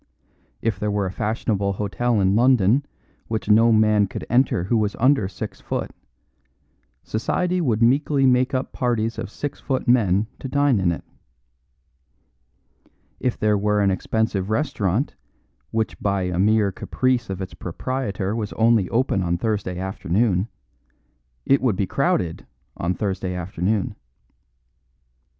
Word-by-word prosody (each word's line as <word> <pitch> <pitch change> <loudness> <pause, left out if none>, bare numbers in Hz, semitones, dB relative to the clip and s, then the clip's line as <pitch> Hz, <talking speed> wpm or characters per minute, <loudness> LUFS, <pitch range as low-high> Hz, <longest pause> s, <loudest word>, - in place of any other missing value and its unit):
If 110 -4 0
there 105 0 -1
were 100 -1 0
a 95 - -3
fashionable 105 -1 -1
hotel 105 +4 0
in 95 0 +3
London 120 +1 +4 0.4
which 110 -3 -3
no 115 +2 +6
man 110 -2 +4
could - - -6
enter 120 -7 +3
who 100 +6 0
was 105 -2 +1
under 130 -5 +3
six 100 - -7
foot, - - -3 1.1
society 180 +11 -1
would 115 -7 +1
meekly 135 +3 +3
make 130 +1 +3
up 130 - -3
parties 115 -3 -1
of - - -4
six 145 +6 -5
foot 130 -2 -2
men 105 -5 +3
to - - -5
dine 140 -3 +2
in 90 -2 +2
it. 85 - -5 2.2
If 125 - -1
there 105 -1 +2
were 105 +1 +1
an 100 -1 +3
expensive 100 0 -1
restaurant 115 - 0 0.6
which 110 0 -2
by 100 -2 0
a 90 -1 -2
mere 105 0 +3
caprice 125 +4 -1
of 95 -1 -4
its 95 -1 -6
proprietor 100 0 -3
was 105 -2 -3
only 115 -4 +3
open 115 -5 +1
on 85 -1 0
Thursday 100 -3 -2
afternoon, 95 +2 0 1.0
it 135 - +3
would 125 -6 +2
be 95 - 0
crowded 85 -2 -1 0.3
on 90 +2 -1
Thursday 95 -3 -2
afternoon. 95 +3 -2
110 Hz, 140 wpm, -23 LUFS, 95-120 Hz, 2.2 s, no